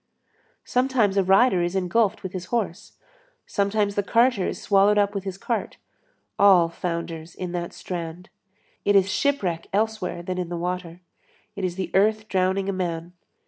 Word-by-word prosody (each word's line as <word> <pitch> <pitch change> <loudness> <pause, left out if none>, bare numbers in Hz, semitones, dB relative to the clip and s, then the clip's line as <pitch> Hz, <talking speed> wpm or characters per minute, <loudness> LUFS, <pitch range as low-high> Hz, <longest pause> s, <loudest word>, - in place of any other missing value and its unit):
Sometimes 250 -6 +1
a 195 - +3
rider 195 +1 +4
is 175 +2 -1
engulfed 200 +3 +1
with 190 - -6
his 185 -2 -5
horse; 215 -7 -3 0.5
sometimes 200 0 0
the 205 - +1
carter 230 -1 +2
is - - -4
swallowed 200 +1 +3
up 205 0 +2
with 200 -2 -4
his 190 -1 -4
cart; 230 +3 -3 0.6
all 185 -4 +6
founders 170 -1 -5
in 180 -1 -5
that 175 -1 -4
strand. 175 0 -6 0.5
It 205 - +3
is 195 -1 +4
shipwreck 195 - 0
elsewhere 210 -4 -1
than 185 +1 -3
in 180 -2 -3
the 175 - -3
water. 180 0 -4 0.5
It 200 - -5
is 180 -2 -1
the 190 0 -4
earth 215 +2 +2
drowning 190 0 0
a 195 - 0
man. 175 -2 -3
190 Hz, 165 wpm, -24 LUFS, 175-205 Hz, 0.6 s, all